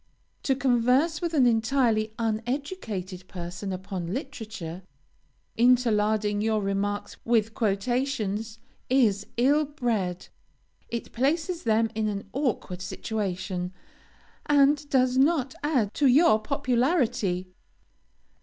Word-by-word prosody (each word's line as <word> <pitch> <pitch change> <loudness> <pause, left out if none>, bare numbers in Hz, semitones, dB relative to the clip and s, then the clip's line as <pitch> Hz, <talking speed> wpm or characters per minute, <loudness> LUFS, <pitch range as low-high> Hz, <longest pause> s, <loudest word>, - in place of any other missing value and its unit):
To 270 - +1
converse 260 +5 +2
with 340 -2 -2
an 265 -4 +5
entirely 225 -2 +2
uneducated 225 - -3
person 180 +2 -6
upon 185 -2 -5
literature, 220 - -6 0.8
interlarding 215 -4 +3
your 220 0 +1
remarks 200 +1 -2
with 225 -2 +1
quotations, 220 0 -1 0.3
is 220 -6 +2
ill 285 +5 +4
bred. 230 - -2 0.6
It 235 0 -5
places 320 +7 -1
them 225 0 +2
in 215 -1 -1
an 200 -1 -4
awkward 240 -9 -2
situation, 185 -2 -3 0.7
and 290 0 +3
does 255 -2 +2
not 275 -2 +2
add 260 -9 +1
to 285 - +3
your 260 -3 +5
popularity. 245 - 0
225 Hz, 100 wpm, -26 LUFS, 205-270 Hz, 0.8 s, an